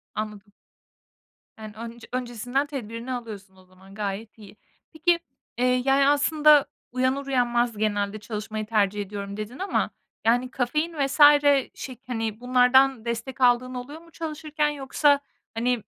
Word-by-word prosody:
Anladım. 210 Hz, -1 st, -6 dB, 1.1 s
Yani, 215 Hz, -1 st, -8 dB
ön 230 Hz, +1 st, -8 dB
öncesinden 245 Hz, +2 st, -2 dB
tedbirini 240 Hz, -2 st, -6 dB
alıyorsun 205 Hz, -6 st, -8 dB
o 185 Hz, -, -19 dB
zaman 190 Hz, +1 st, -18 dB
gayet 210 Hz, +2 st, -5 dB
iyi. 210 Hz, -1 st, -14 dB, 0.4 s
Peki, 335 Hz, +2 st, +2 dB, 0.4 s
eee, 250 Hz, +1 st, +2 dB
yani, 275 Hz, +1 st, +4 dB
aslında 295 Hz, 0 st, +5 dB, 0.3 s
uyanır 255 Hz, +2 st, 0 dB
uyanmaz 240 Hz, -3 st, +1 dB
genelde 205 Hz, -1 st, -1 dB
çalışmayı 215 Hz, 0 st, -5 dB
tercih 210 Hz, -2 st, +1 dB
ediyorum 200 Hz, 0 st, -6 dB
dedin 215 Hz, +4 st, -7 dB
ama, 385 Hz, +1 st, 0 dB, 0.4 s
yani 245 Hz, +3 st, +2 dB
kafein 300 Hz, +7 st, -1 dB
vs. 275 Hz, -, -5 dB, 0.5 s
şey, 255 Hz, -2 st, -8 dB
hani, 225 Hz, -3 st, -3 dB
bunlardan 250 Hz, 0 st, +4 dB
destek 235 Hz, +3 st, -4 dB
aldığın 250 Hz, +1 st, +3 dB
oluyor 280 Hz, +6 st, -7 dB
mu 335 Hz, 0 st, -19 dB
çalışırken, 305 Hz, -2 st, -2 dB
yoksa, 285 Hz, 0 st, +2 dB, 0.3 s
hani, 240 Hz, 0 st, 0 dB
245 Hz, 130 wpm, -25 LUFS, 215-270 Hz, 1.1 s, aslında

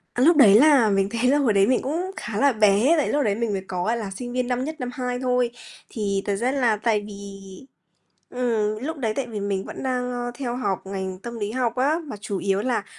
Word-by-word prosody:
Cái 250 Hz, +3 st, +3 dB
lúc 335 Hz, -1 st, +5 dB
đấy 210 Hz, -7 st, +8 dB
là 280 Hz, -7 st, +5 dB
mình 195 Hz, 0 st, +1 dB
thấy 235 Hz, +3 st, +1 dB
là 290 Hz, -, +4 dB
hồi 250 Hz, -7 st, +2 dB
đấy 195 Hz, 0 st, +4 dB
mình 255 Hz, -, +2 dB
cũng 340 Hz, +8 st, -3 dB
khá 220 Hz, -3 st, -5 dB
là 280 Hz, 0 st, +3 dB
bé 215 Hz, +7 st, +4 dB
tại 295 Hz, -, +1 dB
lúc 290 Hz, -1 st, +1 dB
đấy 205 Hz, -3 st, +1 dB
mình 230 Hz, -1 st, -1 dB
mới 195 Hz, -1 st, -2 dB
có, 180 Hz, -1 st, -3 dB
gọi 230 Hz, +3 st, 0 dB
là, 210 Hz, -4 st, -4 dB
sinh 245 Hz, +3 st, -6 dB
viên 250 Hz, -1 st, -1 dB
năm 250 Hz, 0 st, -1 dB
nhất, 315 Hz, +2 st, -4 dB
năm 250 Hz, -1 st, -3 dB
hai 250 Hz, -1 st, -3 dB
thôi. 250 Hz, -2 st, +1 dB, 0.4 s
Thì 200 Hz, -3 st, -2 dB
thật 200 Hz, -, 0 dB
ra 240 Hz, +6 st, 0 dB
là 245 Hz, -6 st, +2 dB
tại 215 Hz, -1 st, 0 dB
vì 205 Hz, -, -9 dB, 1.2 s
ừm, 225 Hz, -4 st, -1 dB
lúc 320 Hz, +3 st, -3 dB
đấy 225 Hz, -6 st, -1 dB
tại 275 Hz, -, -1 dB
vì 220 Hz, -3 st, -6 dB
mình 200 Hz, -1 st, -2 dB
vẫn -, -, -8 dB
đang, 250 Hz, -1 st, -1 dB
ơ, 245 Hz, 0 st, -3 dB
theo 245 Hz, -2 st, -4 dB
học 195 Hz, -7 st, -2 dB
ngành 190 Hz, -1 st, -5 dB
tâm 235 Hz, +3 st, -7 dB
lý 205 Hz, -1 st, -3 dB
học 240 Hz, -1 st, -1 dB
á, 285 Hz, +6 st, +2 dB
mà 270 Hz, -, -6 dB
chủ 205 Hz, -2 st, -4 dB
yếu 195 Hz, +1 st, 0 dB
là 240 Hz, -5 st, -1 dB
235 Hz, 255 wpm, -23 LUFS, 205-255 Hz, 1.2 s, đấy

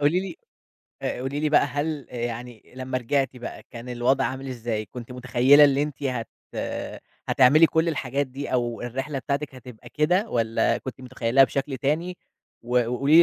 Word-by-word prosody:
قُولي 150 Hz, +6 st, +3 dB
لي 195 Hz, -, -6 dB, 0.7 s
آآ -, -, -2 dB
قولي 135 Hz, +3 st, -3 dB
لي 155 Hz, -, +1 dB
بقى 150 Hz, -, +5 dB
هل 145 Hz, +1 st, -3 dB
يعني 120 Hz, -1 st, -5 dB
لمّا 130 Hz, 0 st, -2 dB
رجعتِ 135 Hz, +1 st, 0 dB
بقى 120 Hz, -, -7 dB
كان 120 Hz, +1 st, -9 dB
الوضع 125 Hz, +2 st, +1 dB
عامل 135 Hz, +1 st, -3 dB
إزاي؟ 115 Hz, -4 st, -3 dB
كنتِ 120 Hz, +4 st, -9 dB
متخيّلة 125 Hz, +3 st, +5 dB
اللي 140 Hz, 0 st, +4 dB
أنتِ 150 Hz, -1 st, -5 dB
هت 125 Hz, -4 st, -2 dB, 1.0 s
هتعملي 145 Hz, +5 st, +6 dB
كل 160 Hz, +1 st, +1 dB
الحاجات 140 Hz, -2 st, -1 dB
دي 135 Hz, +1 st, -6 dB
أو 120 Hz, -2 st, 0 dB
الرحلة 135 Hz, +4 st, -3 dB
بتاعتِك 140 Hz, 0 st, -3 dB
هتبقى 125 Hz, -3 st, -12 dB
كده 180 Hz, +8 st, +2 dB
والّا 115 Hz, -1 st, +1 dB
كنتِ 130 Hz, -1 st, -8 dB
متخيّلاها 130 Hz, +1 st, +3 dB
بشكل 135 Hz, +2 st, -3 dB
تاني؟ 165 Hz, +7 st, -1 dB, 0.5 s
و 120 Hz, 0 st, +1 dB
وقُولي 140 Hz, +6 st, +4 dB
130 Hz, 165 wpm, -25 LUFS, 125-145 Hz, 1.0 s, هتعملي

